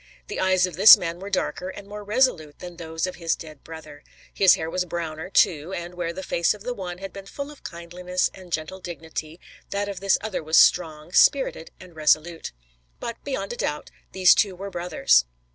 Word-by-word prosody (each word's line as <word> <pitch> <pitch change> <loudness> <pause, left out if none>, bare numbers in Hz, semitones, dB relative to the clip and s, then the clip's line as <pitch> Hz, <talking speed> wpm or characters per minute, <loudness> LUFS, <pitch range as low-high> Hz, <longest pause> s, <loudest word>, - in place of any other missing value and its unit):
The - - -4
eyes 185 -1 +3
of 180 -3 -7
this 200 +3 +10
man 170 0 -5
were 195 +2 -7
darker 185 -1 -2
and 200 +1 -10
more 210 0 -8
resolute 205 - +1
than 175 -1 -10
those 160 -1 -3
of 185 - -6
his 165 -2 0
dead 155 -3 -12
brother; 155 -2 -11 0.3
his 190 -2 +6
hair 160 - -4
was 180 +2 -1
browner, 165 -1 -5
too, 170 -2 +2
and 175 -1 -6
where 175 -1 -3
the 190 +3 -7
face 170 +3 +1
of 205 - -14
the 245 +1 -3
one 180 -5 -6
had 195 0 -8
been 195 -1 -10
full 280 +7 -7
of 295 - -16
kindliness 180 +2 -3
and 185 -2 -14
gentle 160 +4 -4
dignity, 160 -1 -7 0.3
that 200 0 -2
of 200 -3 -5
this 195 0 +2
other 220 -3 -4
was 160 +1 +1
strong, 160 -2 +3
spirited 265 -7 +3
and 180 -3 -14
resolute. 155 +2 +1 0.5
But, 235 - -6
beyond 240 -7 -4
a - - -8
doubt, 150 0 -3 0.2
these 185 -1 +6
two 195 -3 +1
were 195 +2 -7
brothers. 170 - +2
180 Hz, 205 wpm, -24 LUFS, 160-195 Hz, 0.5 s, this